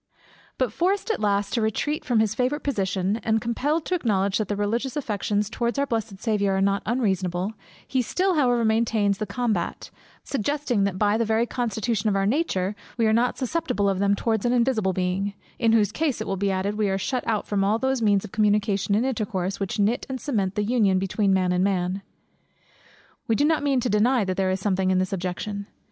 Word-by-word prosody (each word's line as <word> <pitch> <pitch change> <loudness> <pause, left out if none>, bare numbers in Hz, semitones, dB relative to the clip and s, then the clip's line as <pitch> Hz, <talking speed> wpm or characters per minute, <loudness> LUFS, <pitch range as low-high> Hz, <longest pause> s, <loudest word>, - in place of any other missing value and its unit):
_ - - -32 0.3
But 250 -5 0
forced 390 - 0
at - - -2
last 200 -1 0
to 235 - +1
retreat 295 - -1
from 245 -7 +2
his 220 -1 +1
favourite 255 +5 -1
position, 195 -5 0
and 220 -1 0
compelled 285 +8 -1
to - - -2
acknowledge 200 - +1
that 215 - -1
the 205 - -1
religious 230 +6 -1
affections 210 -6 -1
towards 235 +3 -2
our 280 - +2
blessed 225 -6 -3
Saviour 205 -3 +1
are - - +1
not 200 +1 +2
unreasonable; 195 -5 0 0.3
he 260 - +1
still 370 - 0
however 245 -7 +2
maintains 220 -3 +1
the 215 - -2
combat, 215 -2 -2 0.3
suggesting 270 -4 0
that 195 -2 -2
by 210 +1 +2
the - - +3
very 225 +1 +1
constitution 225 -2 -1
of 200 - 0
our 195 0 +1
nature, 205 - 0 0.2
we 230 - +2
are 220 - +3
not 240 +2 +2
susceptible 260 - -1
of 195 -1 0
them 200 0 +3
towards 220 0 -1
an 240 - +2
invisible 235 -5 +2
Being; 185 +2 -1 0.2
in 230 -2 +3
whose 210 -3 +3
case, 295 +1 -1
it - - -3
will 195 - -2
be 200 +1 0
added, 195 +2 -1
we 210 -2 +2
are 190 - 0
shut 250 +6 -2
out 215 -2 0
from 200 -2 0
all 205 +3 +2
those 265 0 0
means 205 -3 +2
of - - -10
communication 205 -2 +1
and 225 +4 +2
intercourse, 205 -6 -2
which 195 +1 -3
knit 210 +4 +1
and 260 -1 -3
cement 200 -10 -1
the 210 - 0
union 205 -4 +2
between 195 +1 +1
man 185 -1 +2
and 180 +1 +2
man. 190 -1 0 1.3
We 225 - +2
mean 290 +6 +3
not 320 - +2
to 280 -2 +1
deny 225 +2 +2
that 185 -1 -2
there 190 0 +1
is 185 +1 0
something 190 -1 0
in 185 - +3
this 185 +1 0
objection. 195 +2 -4
210 Hz, 215 wpm, -24 LUFS, 195-240 Hz, 1.3 s, the